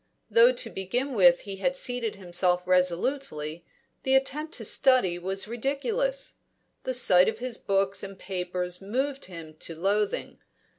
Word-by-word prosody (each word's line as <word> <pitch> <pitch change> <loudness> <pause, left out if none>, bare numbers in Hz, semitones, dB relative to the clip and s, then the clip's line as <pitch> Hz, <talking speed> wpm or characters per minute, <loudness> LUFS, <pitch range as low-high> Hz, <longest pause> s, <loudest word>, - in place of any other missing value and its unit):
Though 480 +1 +7
to - - -2
begin 245 +9 -2
with 180 -5 +5
he 195 -1 -7
had 265 +7 0
seated 245 -5 -1
himself 180 -1 +1
resolutely, 180 - 0 0.3
the 265 0 +2
attempt 300 +4 0
to - - -5
study 220 -10 +3
was 190 +2 -3
ridiculous; 435 - -2 0.5
the 255 - -1
sight 180 -7 +5
of 220 - -5
his 245 0 -4
books 195 0 0
and 195 -1 -8
papers 180 -1 -4
moved 265 +7 -2
him 165 -4 -10
to 165 - -3
loathing. 200 +4 -1
200 Hz, 145 wpm, -27 LUFS, 180-265 Hz, 0.5 s, Though